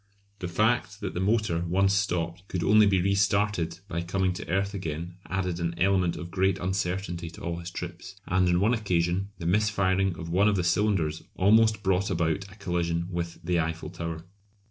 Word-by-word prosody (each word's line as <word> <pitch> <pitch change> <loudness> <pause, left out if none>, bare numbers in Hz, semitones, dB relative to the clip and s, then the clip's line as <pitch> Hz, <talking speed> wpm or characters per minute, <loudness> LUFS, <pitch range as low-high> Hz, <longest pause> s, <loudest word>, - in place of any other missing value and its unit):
The 90 - -3
fact 105 +1 +1
that 100 - -3
the - - -3
motor, 105 -3 +1
once 95 +3 +3
stopped, 90 -2 -1
could 90 -3 -2
only 105 0 +6
be 95 -3 +2
restarted 100 -3 +1
by 85 -4 -3
coming 90 +1 0
to - - -8
earth 100 +3 0
again 85 -2 -4
added 90 -2 -2
an 85 -1 -2
element 95 -2 +2
of 85 0 -7
great 95 0 +2
uncertainty 90 -2 -2
to 85 - -13
all 85 0 -3
his 85 0 -6
trips; 90 +2 -7
and 90 0 +2
on 90 0 +3
one 105 +5 +3
occasion 90 -3 0
the 85 - -7
mis 105 +5 +3
firing 95 -2 +1
of 85 - -6
one 100 +4 +4
of 105 - +3
the 90 - 0
cylinders 85 -4 +1
almost 110 +2 +4
brought 95 +1 +1
about 90 +2 -1
a - - -13
collision 85 -3 -1
with 85 -1 -3
the 85 0 +1
Eiffel 80 -1 -3
Tower. 85 -1 -5
90 Hz, 190 wpm, -27 LUFS, 85-100 Hz, -, only